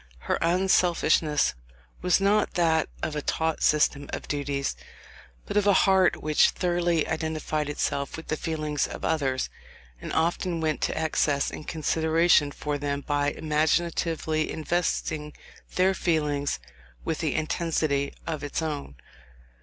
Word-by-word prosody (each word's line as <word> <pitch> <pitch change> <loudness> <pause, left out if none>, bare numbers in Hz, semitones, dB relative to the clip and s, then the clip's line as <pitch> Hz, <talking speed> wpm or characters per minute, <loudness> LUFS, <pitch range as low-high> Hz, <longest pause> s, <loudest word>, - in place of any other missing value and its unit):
Her - - -1
unselfishness 170 -4 +2 0.5
was 180 0 +3
not 205 +2 +2
that 160 -3 +2
of 155 -1 -2
a 150 - -1
taught 160 +2 -1
system 145 -2 +2
of - - -5
duties, 140 - -2 0.7
but - - -5
of 205 -1 +3
a 200 - +6
heart 190 -1 +3
which 155 -1 +4
thoroughly 175 -2 0
identified 155 -1 -2
itself 140 -1 -2
with 160 - -8
the 155 - -1
feelings 155 -2 -2
of - - -6
others, 135 -5 0 0.5
and - - -6
often 170 +1 0
went 155 -1 -1
to - - -1
excess 155 -3 +1
in 155 - -8
consideration 160 0 +2
for 145 0 -3
them 140 0 -2
by 145 0 0
imaginatively 155 +1 0
investing 155 -2 -2 0.4
their 185 +1 +4
feelings 150 -6 0 0.5
with 160 - -2
the 160 -4 -1
intensity 155 -3 0
of 155 -3 -4
its 145 +3 -2
own. 145 - -4
155 Hz, 135 wpm, -26 LUFS, 150-170 Hz, 0.7 s, a